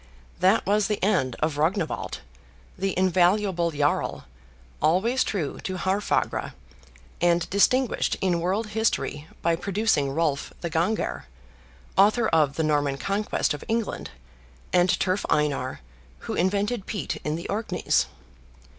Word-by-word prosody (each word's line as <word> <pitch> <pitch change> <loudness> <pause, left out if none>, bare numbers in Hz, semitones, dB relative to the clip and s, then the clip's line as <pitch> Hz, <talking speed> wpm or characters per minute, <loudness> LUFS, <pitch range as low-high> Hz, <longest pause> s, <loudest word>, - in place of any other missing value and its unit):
That 190 +4 +3
was 205 0 +2
the 210 - 0
end 180 - +2
of 155 -1 0
Rognwald, 165 +2 -1 0.5
the 195 -1 -2
invaluable 185 -1 +2
jarl, 145 -2 -1 0.6
always 190 - +3
true 170 -9 -3
to 185 -1 -4
Haarfagr; 190 +3 0 0.7
and 175 0 +3
distinguished 250 +6 +2
in 180 -3 +1
world 195 +6 -1
history 215 -8 -1 0.2
by 170 0 +3
producing 195 -6 +1
Rolf 145 -1 -1
the 170 - -3
Ganger, 175 - -1 0.7
author 215 +3 +5
of 150 -4 +2
the 160 - 0
Norman 145 -2 +1
Conquest 200 +8 0
of 150 - -7
England, 225 -1 -2 0.6
and 180 0 +4
Turf 185 +1 0
Einar, 140 - 0 0.4
who - - -5
invented 200 +4 0
peat 200 -9 -3
in 150 0 -3
the 170 - -5
Orkneys. 205 -3 0
185 Hz, 125 wpm, -25 LUFS, 155-205 Hz, 0.7 s, author